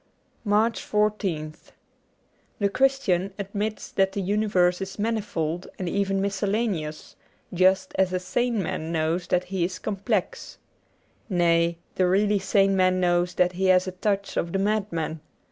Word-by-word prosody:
79 210 - -7
MARCH 220 +3 +2
14th 195 -8 0 1.0
THE 200 -1 +1
Christian 200 -7 +1
admits 205 +2 -4
that 195 0 +1
the 200 - -2
universe 190 -3 +2
is 195 0 -5
mani 220 +1 0
fold 170 -2 -3
and 185 - -4
even 195 +2 0
miscellaneous, 195 -5 -2 0.4
just 185 +1 +3
as 190 -1 +3
a 185 - 0
sane 235 +3 -1
man 160 -1 -4
knows 165 +2 -1
that 180 0 +1
he 185 -1 -2
is 185 +2 -2
complex. 200 -1 -3 0.7
Nay, 170 -2 +2 0.2
the 185 - +2
really 205 +2 +2
sane 195 0 +2
man 185 -1 +3
knows 175 0 +1
that 180 0 +3
he 185 +1 -2
has 185 -1 +4
a - - -2
touch 200 +1 -2
of 170 - -1
the - - +1
madman. 195 -6 -1
190 Hz, 150 wpm, -25 LUFS, 175-205 Hz, 1.0 s, has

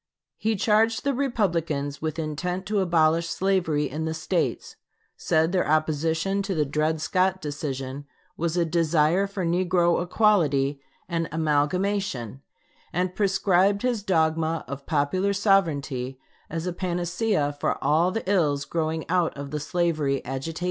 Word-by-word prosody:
He 220 0 +1
charged 220 +2 +2
the 280 - +1
Republicans 170 - -1
with 160 0 -3
intent 170 +4 -3
to 210 0 0
abolish 165 -2 +2
slavery 175 -6 +1
in 155 +4 -4
the 160 0 -2
States; 155 - -2 0.4
said 160 +1 +1
their 185 -1 +1
opposition 160 +5 +1
to 195 -1 -3
the 150 -2 +1
Dred 155 +3 0
Scott 185 +4 +1
decision 140 -3 -5 0.3
was 170 +1 -2
a 170 - +3
desire 165 +2 +2
for 195 -2 -4
negro 175 0 +2
equality 155 -8 +2 0.3
and 165 -1 -2
amalgamation; 155 - 0 0.5
and 180 +1 -1
prescribed 195 0 +2
his 245 -4 0
dogma 160 -3 +1
of 140 +1 -7
popular 165 +7 +1
sovereignty 145 - +1 0.3
as 165 +1 -4
a 180 - -2
panacea 175 -3 -1
for - - 0
all 165 +4 +3
the 225 +1 -4
ills 150 -8 +1
growing 160 -1 -2
out 175 -3 +1
of 140 0 -6
the 150 - -2
slavery 150 -4 0
agitation. 135 +6 -4
165 Hz, 140 wpm, -25 LUFS, 150-190 Hz, 0.5 s, a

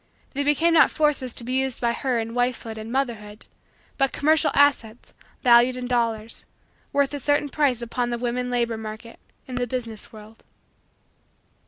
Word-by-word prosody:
They 285 - -1
became 295 +4 +3
not 320 - +6
forces 295 -5 0
to - - -3
be 250 +2 -4
used 265 -1 -1
by 235 -1 +1
her 255 -1 -1
in 225 0 -4
wifehood 245 -2 -1
and 220 +1 -7
motherhood 230 -5 -3 0.5
but 270 -1 +2
commercial 310 +1 +3
assets, 255 -5 +2 0.3
valued 245 0 +5
in 250 - -4
dollars, 230 -2 -2 0.4
worth 280 0 +1
a 285 - -3
certain 290 +1 +1
price 265 -5 +1
upon 240 +1 -2
the 240 - -2
woman 245 +1 -2
labor 235 -2 0
market 220 +1 -8 0.3
in 255 - -9
the 245 0 -1
business 230 -3 -6
world. 215 0 -14
245 Hz, 165 wpm, -24 LUFS, 230-270 Hz, 0.5 s, not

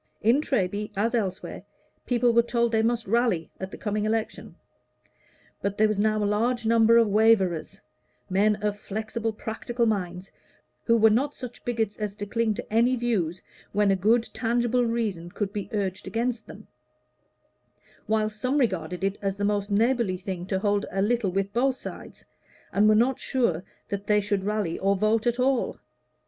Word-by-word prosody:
In 235 +7 +4
Treby, 210 -7 -1
as 225 +4 +1
elsewhere, 195 -6 -2 0.5
people 240 -1 +2
were 235 - +6
told 235 0 0
they 220 -1 +2
must 235 +1 0
"rally" 220 -6 +1
at 190 - -5
the - - -9
coming 210 0 -2
election; 220 +1 -2 1.1
but 200 0 -2
there 215 - +4
was 215 -1 -1
now 215 0 +2
a - - +1
large 230 +3 0
number 230 0 +5
of 230 -1 +5
waverers 205 -5 +2 0.5
men 205 +3 +3
of 210 -1 0
flexible, 220 +2 -3
practical 230 +2 -3
minds, 185 -4 -2 0.5
who 230 -1 +4
were 220 0 +5
not 275 +7 +1
such 250 -2 -9
bigots 225 -4 -1
as 210 -2 -4
to 205 - -5
cling 220 +1 0
to 210 - -8
any 240 +3 +4
views 200 -9 -1 0.3
when 205 -1 +3
a - - +3
good 225 +5 +2
tangible 240 +1 +1
reason 210 -7 -2
could 200 +2 -4
be 205 -2 -4
urged 195 -4 -3
against 230 0 -2
them; 215 - -12 1.4
while 215 0 +2
some 255 +6 -1
regarded 190 - -1
it 195 +1 -1
as 195 -1 -2
the 205 - -1
most 205 0 0
neighborly 225 -2 +2
thing 180 -1 -5
to 190 - 0
hold 205 +1 +1
a 195 0 0
little 230 -1 +1
with 195 +2 -2
both 260 +3 +1
sides, - - -10 0.5
and 210 +2 +4
were 215 - +5
not 245 +4 +2
sure 235 -11 0 0.3
that 200 0 -4
they 210 0 +4
should 200 -1 -1
rally 210 -5 -1
or 195 +1 +2
vote 215 +3 +1
at 240 +1 0
all. 255 -1 +1
215 Hz, 175 wpm, -26 LUFS, 200-235 Hz, 1.4 s, were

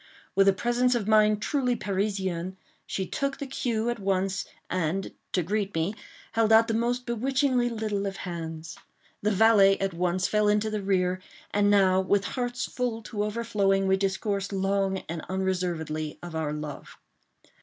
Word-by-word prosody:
With 195 0 +5
a - - +8
presence 240 +5 +1
of 220 -4 -1
mind 215 -1 +4
truly 260 -4 +1
Parisian, 190 -3 -2 0.3
she 190 - -2
took 275 +8 -2
the 280 - -5
cue 235 -4 -1
at 240 - -5
once, 195 -1 0 0.2
and, 185 +1 -1 0.2
to 180 - +1
greet 200 +2 -2
me, 165 +5 0 0.4
held 225 -1 +2
out 225 +1 +7
the 225 - 0
most 240 +2 0
bewitchingly 250 +1 +1
little 215 -3 -2
of 195 - -5
hands. 165 -2 -6 0.4
The 210 - +2
valet 200 -2 +5
at 195 -1 -1
once 180 +2 0
fell 210 0 +2
into 210 +1 +2
the 215 -1 -2
rear, 185 -1 +1 0.3
and 205 0 +3
now, 190 -2 +4
with 200 +1 +1
hearts 245 -1 -2
full 240 -3 -3
to 210 -1 -3
overflowing, 210 -3 +1
we 190 - +4
discoursed 195 +1 -1
long 195 0 0
and 165 0 -4
unreservedly 175 -5 -2
of 175 -2 -7
our 160 -2 -1
love. 150 -1 -7
200 Hz, 165 wpm, -27 LUFS, 185-225 Hz, 0.4 s, a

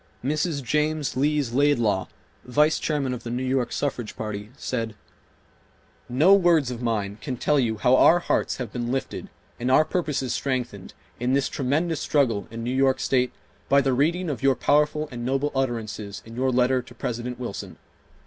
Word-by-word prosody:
Mrs. 150 +1 -1
James 150 +3 0
Lees 145 -1 +1
Laidlaw, 120 -9 +2 0.4
Vice 150 +5 +2
Chairman 140 -4 -1
of 125 - -5
the 120 - -7
New 125 +2 -2
York 130 -2 0
Suffrage 125 -6 -3
Party, 105 -1 -5
said: 115 -4 -3 1.1
"No 150 +10 +5
words 170 -9 +4
of 120 -1 -6
mine 105 -3 -2
can 130 -4 -4
tell 145 +4 +2
you 115 -4 0
how 125 +4 +4
our 165 +6 +6
hearts 175 - 0
have 125 -5 -6
been 120 -1 -2
lifted 135 0 -3 0.3
and 125 +1 -1
our 140 +4 +5
purposes 150 -7 -1
strengthened 125 -8 -3 0.2
in 125 +2 0
this 140 0 +2
tremendous 150 +5 -1
struggle 120 -9 +1
in 115 +1 -6
New 125 +2 -2
York 135 0 +2
State 125 -1 +1 0.4
by 140 - +6
the 135 -1 +1
reading 170 +7 +1
of 145 -4 -3
your 135 -1 +4
powerful 150 +3 +2
and 120 -1 -6
noble 135 +4 0
utterances 110 -6 -3
in 115 +1 -11
your 130 +2 +1
letter 125 +1 +2
to 120 -1 -15
President 120 0 -4
Wilson. 125 - -6
130 Hz, 175 wpm, -25 LUFS, 120-145 Hz, 1.1 s, our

